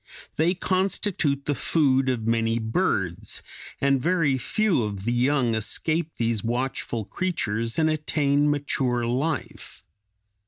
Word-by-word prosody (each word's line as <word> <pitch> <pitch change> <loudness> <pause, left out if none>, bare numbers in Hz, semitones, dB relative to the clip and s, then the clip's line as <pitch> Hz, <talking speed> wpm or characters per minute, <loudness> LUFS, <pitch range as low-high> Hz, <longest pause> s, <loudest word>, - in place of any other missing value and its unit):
They 170 +4 +2
constitute 185 -6 0
the 145 - +1
food 135 -2 +2
of 120 -4 -1
many 115 0 +1
birds, 110 -1 -1 0.4
and 140 -2 +2
very 165 -4 +2
few 205 - +1
of 100 -3 -4
the 120 - +1
young 125 -1 +2
escape 155 +9 0
these 115 -3 0
watchful 120 -2 -2
creatures 115 - -2
and 160 -1 +3
attain 150 -1 +1
mature 130 -4 0
life. 135 +4 -3
135 Hz, 120 wpm, -25 LUFS, 115-155 Hz, 0.4 s, and